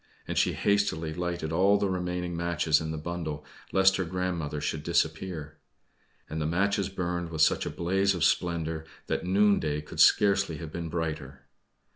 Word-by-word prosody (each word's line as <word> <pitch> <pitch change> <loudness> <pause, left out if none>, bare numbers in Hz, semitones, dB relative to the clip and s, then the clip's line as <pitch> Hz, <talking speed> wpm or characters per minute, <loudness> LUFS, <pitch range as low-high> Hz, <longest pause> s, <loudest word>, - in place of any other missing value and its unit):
And - - -3
she - - +2
hastily 90 -6 0
lighted 85 -2 -3
all 95 +4 +4
the 100 0 0
remaining 90 -1 -2
matches 85 -2 +1
in 80 - -4
the 80 - -3
bundle, 80 -2 -5 0.3
lest 95 0 +4
her 95 - 0
grandmother 85 -4 -3
should 75 +1 -2
disappear. 80 -1 -2 0.7
And 80 +1 -4
the 75 - 0
matches 100 +4 +1
burned 90 -2 -3
with 80 -2 -3
such - - +2
a - - -1
blaze 95 +3 +1
of 85 - -1
splendor, 80 -2 0 0.2
that - - -2
noonday 95 -6 +2
could 75 - -10
scarcely 100 -5 +4
have 80 0 -7
been 85 0 -5
brighter. 75 -5 -4
85 Hz, 165 wpm, -28 LUFS, 80-95 Hz, 0.7 s, all